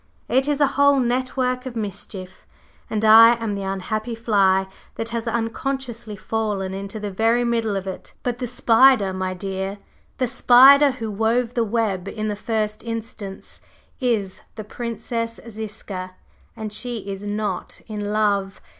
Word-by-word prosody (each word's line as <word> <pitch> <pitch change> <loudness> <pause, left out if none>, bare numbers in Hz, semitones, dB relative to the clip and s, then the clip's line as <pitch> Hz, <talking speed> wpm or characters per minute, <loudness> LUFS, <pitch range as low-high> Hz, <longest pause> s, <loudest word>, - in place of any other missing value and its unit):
It 265 +3 +2
is 290 -1 0
a 290 - +5 0.2
whole 285 -1 +5
network 255 +1 -1
of 245 - -7
mischief, 200 -3 -6 0.4
and 220 0 -1
I 225 +2 +9
am 225 -3 -3
the 200 - -4
unhappy 215 +4 -3
fly 195 -4 +2 0.3
that 225 - -3
has 230 0 -3
unconsciously 235 0 -3
fallen 205 -3 -2
into 195 +2 -5
the 205 -1 -4
very 225 +5 +2
middle 230 -3 0
of 195 -1 -3
it. 190 - -8
But 245 -1 -2
the 250 - -2
spider, 230 -3 +4
my 185 0 -3
dear, 190 +1 -4 0.4
the 255 - +1
spider 265 +3 +7
who 225 -4 -5
wove 225 +3 0
the 235 - +1
web 205 -4 -1
in 215 +1 -3
the 210 - -2
first 215 0 -2
instance, 225 -4 -7 0.4
is 220 -7 -1
the 215 - -6
Princess 230 +1 -4
Ziska, 200 -4 -7 0.4
and 215 -2 -5
she 240 +1 -4
is 195 -1 -5
not 205 +1 -3
in 210 -2 -4
love! 200 -2 0
220 Hz, 155 wpm, -22 LUFS, 200-240 Hz, 0.4 s, I